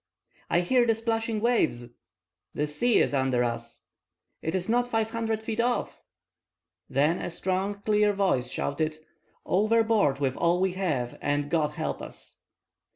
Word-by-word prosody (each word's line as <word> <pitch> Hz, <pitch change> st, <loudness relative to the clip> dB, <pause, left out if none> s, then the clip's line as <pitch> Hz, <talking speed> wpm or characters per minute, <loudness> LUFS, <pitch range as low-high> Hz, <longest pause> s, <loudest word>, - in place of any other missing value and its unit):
"I 175 Hz, -, +3 dB
hear 240 Hz, +7 st, +3 dB
the 225 Hz, -, +3 dB
splashing 225 Hz, -1 st, -1 dB
waves!" 230 Hz, -, +1 dB, 0.7 s
"The 150 Hz, -, 0 dB
sea 150 Hz, +11 st, +1 dB
is -, -, -2 dB
under 130 Hz, -3 st, +2 dB
us!" 115 Hz, -1 st, -4 dB, 0.6 s
"It 160 Hz, -, -2 dB
is 185 Hz, -1 st, -1 dB
not 245 Hz, +2 st, +2 dB
five 225 Hz, -2 st, -1 dB
hundred 225 Hz, -1 st, -2 dB
feet 220 Hz, 0 st, -4 dB
off!" 240 Hz, +1 st, -1 dB, 0.9 s
Then 150 Hz, +6 st, +2 dB
a -, -, -3 dB
strong, 190 Hz, +3 st, -2 dB
clear 210 Hz, -1 st, +3 dB
voice 190 Hz, -12 st, +1 dB
shouted:— 155 Hz, +4 st, -2 dB, 0.5 s
"Overboard 215 Hz, -6 st, +3 dB
with 135 Hz, -2 st, -1 dB
all 170 Hz, +1 st, +2 dB
we 190 Hz, -1 st, +1 dB
have, 150 Hz, -11 st, -2 dB
and 145 Hz, 0 st, -1 dB
God 155 Hz, -3 st, +1 dB
help -, -, -3 dB
us!" -, -, -10 dB
185 Hz, 150 wpm, -27 LUFS, 145-225 Hz, 0.9 s, I